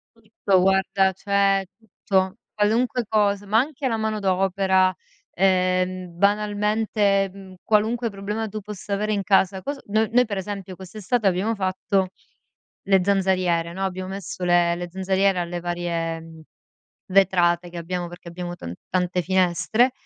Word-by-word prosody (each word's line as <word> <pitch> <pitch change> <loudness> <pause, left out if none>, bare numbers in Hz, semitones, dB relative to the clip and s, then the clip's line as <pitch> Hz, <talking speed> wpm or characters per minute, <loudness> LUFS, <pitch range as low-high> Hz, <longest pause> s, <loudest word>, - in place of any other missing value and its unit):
Tutto 210 -4 0
guarda 190 0 +3
cioè, 195 0 +1
tutto, 195 -2 -1 0.2
qualunque 235 +4 +1
cos 205 -2 +2
ma 215 +3 +3
anche 275 0 -2
la 225 -2 0
manodopera, 190 -3 +1 0.4
ehm, 185 -1 +1
banalmente, 205 0 +1
mhmm, 190 -1 -12
qualunque 225 +2 +1
problema 210 +2 -4
tu 215 +1 -5
possa 205 0 -6
avere 210 +1 0
in 200 -1 -1
casa. 190 -1 +2
Cos 285 +5 -4
no 215 +2 +1
noi 250 +1 +4
per 205 -3 -4
esempio 190 -1 -5
quest'estate 205 +4 -2
abbiamo 190 +5 +1
fatto 190 0 0 0.8
le 195 -1 +4
zanzariere, 185 -4 +1
no. 190 +2 -3
Abbiamo 185 0 -4
messo 190 -2 -6
le 175 -1 +3
le 175 0 -5
zanzariere 190 0 +1
alle 175 0 -3
varie, 170 -1 -2
mhmm, 160 0 -13 0.7
vetrate 180 -2 +3
che 175 - -9
abbiamo 175 +1 -3
perché 175 0 -12
abbiamo 175 0 -6
tan 85 - -7 0.2
tante 180 0 0
finestre, 190 +7 +2
195 Hz, 140 wpm, -23 LUFS, 180-210 Hz, 0.8 s, noi